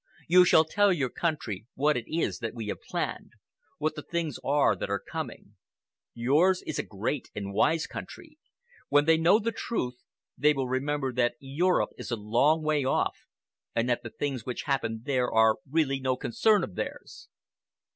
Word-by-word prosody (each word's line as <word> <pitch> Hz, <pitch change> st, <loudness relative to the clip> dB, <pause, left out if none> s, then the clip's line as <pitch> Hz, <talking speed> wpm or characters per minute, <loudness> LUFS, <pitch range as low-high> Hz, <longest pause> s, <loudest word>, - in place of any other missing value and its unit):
You 180 Hz, +2 st, +7 dB
shall 160 Hz, -2 st, +5 dB
tell 205 Hz, +5 st, +3 dB
your 140 Hz, -9 st, 0 dB
country 120 Hz, -, -3 dB
what 150 Hz, +3 st, +2 dB
it 120 Hz, -, -3 dB
is 165 Hz, +1 st, -1 dB
that 115 Hz, -1 st, -4 dB
we 110 Hz, -3 st, -5 dB
have -, -, -4 dB
planned, -, -, -4 dB, 0.4 s
what 155 Hz, +1 st, -1 dB
the 150 Hz, -, -5 dB
things 165 Hz, -4 st, -3 dB
are 140 Hz, -6 st, +3 dB
that 90 Hz, -, -5 dB
are 100 Hz, -, +1 dB
coming. -, -, -7 dB, 0.6 s
Yours 155 Hz, +11 st, +3 dB
is 155 Hz, -, -4 dB
a -, -, 0 dB
great 110 Hz, +7 st, -3 dB
and 100 Hz, -1 st, -5 dB
wise 160 Hz, +10 st, +2 dB
country. 310 Hz, -2 st, -10 dB, 0.5 s
When 145 Hz, 0 st, +4 dB
they 160 Hz, 0 st, +5 dB
know 170 Hz, +5 st, +5 dB
the 230 Hz, +1 st, -1 dB
truth, 125 Hz, -, -4 dB, 0.3 s
they 150 Hz, +4 st, +4 dB
will 135 Hz, -2 st, -2 dB
remember 135 Hz, +1 st, -1 dB
that 120 Hz, -1 st, +1 dB
Europe 160 Hz, +7 st, +1 dB
is -, -, -6 dB
a 120 Hz, -, 0 dB
long 120 Hz, +9 st, +2 dB
way 155 Hz, -2 st, +1 dB
off 130 Hz, -, -1 dB, 0.5 s
and 115 Hz, +1 st, +1 dB
that 120 Hz, -, 0 dB
the 115 Hz, -, -7 dB
things 135 Hz, -2 st, -3 dB
which 125 Hz, 0 st, -4 dB
happen 115 Hz, -6 st, -2 dB
there 130 Hz, -3 st, 0 dB
are 110 Hz, -1 st, +4 dB
really 140 Hz, -3 st, +1 dB
no 130 Hz, -1 st, 0 dB
concern 200 Hz, -, +2 dB
of 100 Hz, -, -5 dB
theirs. -, -, -6 dB
140 Hz, 180 wpm, -28 LUFS, 120-160 Hz, 0.6 s, You